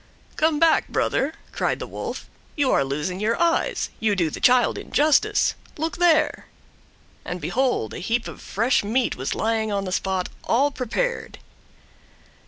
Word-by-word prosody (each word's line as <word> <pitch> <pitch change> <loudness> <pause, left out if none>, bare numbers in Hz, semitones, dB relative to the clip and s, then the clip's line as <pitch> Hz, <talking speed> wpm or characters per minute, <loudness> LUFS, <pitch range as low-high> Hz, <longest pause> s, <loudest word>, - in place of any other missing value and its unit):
"Come 310 -1 +2
back 325 0 +4
brother," 285 +4 0 0.2
cried - - -1
the - - -5
Wolf. - - -6 0.3
"You 285 -4 +2
are - - +3
losing 150 +7 -3
your 220 +6 0
eyes. 335 -1 +1
You 215 -2 +1
do 170 -5 0
the - - -6
child 250 -1 +4
injustice. 300 0 +2 0.2
Look 320 +3 -2
there!" 335 -3 +2 0.8
and 180 - -5
behold 250 - 0
a - - -6
heap 230 +6 -1
of - - -9
fresh 230 +4 +1
meat 235 +4 0
was 130 +1 -3
lying 220 -1 0
on 200 -1 -1
the 185 - -4
spot, 190 0 -1
all 275 +5 +2
prepared. 280 - -3
235 Hz, 155 wpm, -23 LUFS, 195-295 Hz, 0.8 s, back